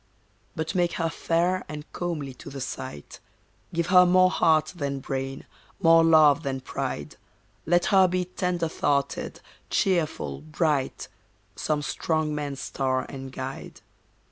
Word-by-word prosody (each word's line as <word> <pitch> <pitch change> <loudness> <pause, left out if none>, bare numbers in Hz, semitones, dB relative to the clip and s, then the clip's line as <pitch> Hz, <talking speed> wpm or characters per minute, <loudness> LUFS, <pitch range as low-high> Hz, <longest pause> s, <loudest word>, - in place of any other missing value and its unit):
But 160 +2 -3
make 175 -2 +1
her 165 -1 -1
fair 175 +4 0
and 150 0 -6
comely 155 -6 -3
to - - -11
the 135 - -7
sight, 125 - -7 0.5
Give 170 -1 0
her 180 +1 +7
more 185 +1 +5
heart 155 -2 +3
than 140 -4 -2
brain, 135 0 -4 0.3
more 165 -2 +6
love 155 -2 +6
than 135 -3 -3
pride. - - -4 0.5
Let 175 +1 +3
her 190 -1 +7
be 180 0 -1
tender 180 -2 -1
thoughted, 140 -3 -1 0.3
cheerful, 175 -5 0
bright, 150 -3 -1 0.5
Some 150 -1 -1
strong 155 0 -1
man's 145 -2 -4
star 130 -1 -1
and 135 -1 -7
guide. 130 0 -7
155 Hz, 135 wpm, -26 LUFS, 140-175 Hz, 0.5 s, her